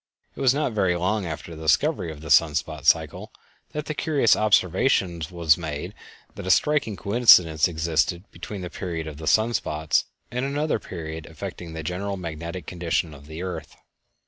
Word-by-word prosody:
It - - -7
was 130 -2 +5
not 145 -1 0
very 95 -4 +2
long 95 +2 -1
after 80 +1 -6
the 80 - -10
discovery 90 - +1
of 75 -1 -10
the 80 -1 -6
sun 75 0 +5
spot 75 0 -3
cycle - - +2 0.4
that 150 0 -4
the 155 - -3
curious 145 -7 +3
observation 95 -3 +2
was 85 -3 +2
made 75 -3 -5 0.4
that - - -8
a - - -1
striking 145 -3 +2
coincidence 95 -7 +5
existed 85 +1 0
between 95 +3 -7
the 90 - -6
period 85 -4 -4
of 75 -2 -8
the 80 0 -7
sun 110 +2 +3
spots 80 -7 0 0.3
and 125 +1 -2
another 145 -1 0
period 80 -4 -7
affecting 85 -2 -8
the 80 -1 -5
general 95 +5 -3
magnetic 85 0 -6
condition 85 -2 -2
of 70 0 -14
the 80 +3 -7
earth. 85 -4 -6
85 Hz, 175 wpm, -24 LUFS, 80-105 Hz, 0.4 s, was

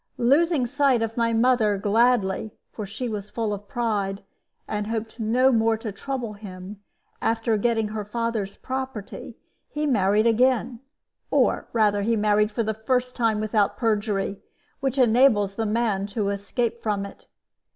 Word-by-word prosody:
Losing 285 +3 +3
sight 265 -2 +2
of 225 0 -3
my 230 -1 +1
mother 225 -3 +3
gladly 215 0 +1 0.2
for 210 -3 -6
she 220 +5 -4
was 210 -2 -5
full 220 -2 -2
of 205 0 -7
pride, 205 -4 -2 0.4
and 210 0 -3
hoped 225 +1 -4
no 245 +4 +3
more 225 -1 +2
to 220 -1 -5
trouble 240 +1 -4
him, 200 -1 -9 0.4
after 225 0 +1
getting 225 0 +1
her 215 0 -4
father's 220 -2 -3
property 260 -5 -6 0.3
he 300 0 -2
married 210 -5 +2
again, 240 0 +2 0.5
or - - +2
rather 210 -3 +2
he 230 +3 +1
married 210 0 +2
for 225 +2 -2
the 220 0 -1
first 250 +3 -1
time 225 -3 +1
without 215 -1 +1
perjury, 205 -3 -1 0.4
which 270 -1 -2
enables 230 -5 +4
the 225 +2 -2
man 210 -3 0
to 205 -1 -2
escape 230 +4 -2
from 205 -2 -1
it. 200 - -13
220 Hz, 150 wpm, -24 LUFS, 205-240 Hz, 0.5 s, enables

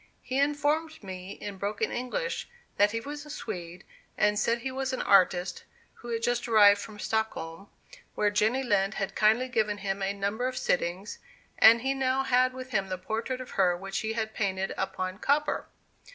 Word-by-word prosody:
He 260 +1 -1
informed 295 +1 0
me 185 0 -7
in 200 -2 -8
broken 205 +1 -1
English 365 - -3 0.3
that 205 +1 +5
he 230 +2 -2
was 290 +4 -7
a 300 - -13
Swede, 180 - -6 0.3
and 210 0 +3
said 230 +2 +2
he 260 +3 -4
was 265 0 -2
an 260 - -1
artist, 180 -1 +3 0.3
who 240 - -13
had 230 -1 -2
just 240 0 0
arrived 205 -3 +6
from 210 0 -9
Stockholm, 200 -5 -3 0.5
where 205 -1 +2
Jenny 220 +6 +2
Lind 205 -3 +1
had 195 - -3
kindly 220 +4 +3
given 215 -4 0
him 195 0 -3
a 195 0 0
number 200 +5 -2
of 255 - -4
sittings, 180 +4 -1 0.4
and 230 +1 +7
he 270 +1 +1
now 265 0 +1
had 255 -1 +3
with 255 0 -9
him 195 -4 0
the 185 - -2
portrait 225 +7 -3
of 255 - -9
her 180 -3 +2
which 195 +2 -4
he 220 0 -2
had 220 -1 -3
painted 195 -2 -1
upon 185 0 -3
copper. 295 +4 +1
220 Hz, 185 wpm, -28 LUFS, 195-255 Hz, 0.5 s, and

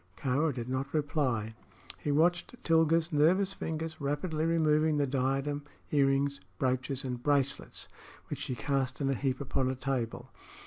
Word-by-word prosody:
Kāra 145 +4 +1
did 120 -3 -5
not 130 +3 -3
reply. 130 -8 0 0.5
He 145 - -1
watched 175 +8 +2
Tilga's 165 0 +3
nervous 185 +6 +3
fingers 160 -3 -4
rapidly 155 +3 -1
removing 155 -2 +3
the 145 - +2
diadem, 135 +2 -1 0.3
earrings, 140 0 +2 0.2
brooches 130 +1 0
and 125 -2 -3
bracelets, 140 0 0 0.4
which - - -5
she 130 - -3
cast 135 0 -1
in 135 -1 +1
a - - 0
heap 130 -1 -1
upon 135 -1 0
a 130 - -1
table. 130 -3 -3
140 Hz, 145 wpm, -31 LUFS, 130-155 Hz, 0.5 s, Tilga's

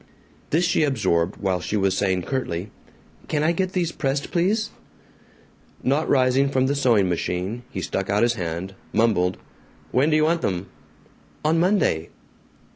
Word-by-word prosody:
This 170 +4 +2
she 175 - +2
absorbed 100 - +1
while 95 -2 -1
she 105 - -2
was 95 -1 +1
saying 95 -2 0
curtly, 100 -7 -3 0.6
"Can 150 -1 0
I 160 - +3
get 185 +2 -1
these 175 -3 0
pressed, 140 -1 -2
please?" 205 +5 +1 1.1
Not 140 +5 +1
rising 130 +1 +3
from 130 -1 +2
the 140 - +1
sewing 120 -8 +3
machine 90 +5 -2
he 95 - -5
stuck 95 +2 -3
out 105 +2 +2
his 120 0 +3
hand, 90 -2 -4 0.2
mumbled, 95 -5 +2 0.5
"When 135 +5 +3
do 155 - +3
you 155 - +4
want 165 +2 +2
them?" 90 0 -2 0.8
"Oh, 155 - +3
Monday." 165 - +2
125 Hz, 155 wpm, -23 LUFS, 95-155 Hz, 1.1 s, you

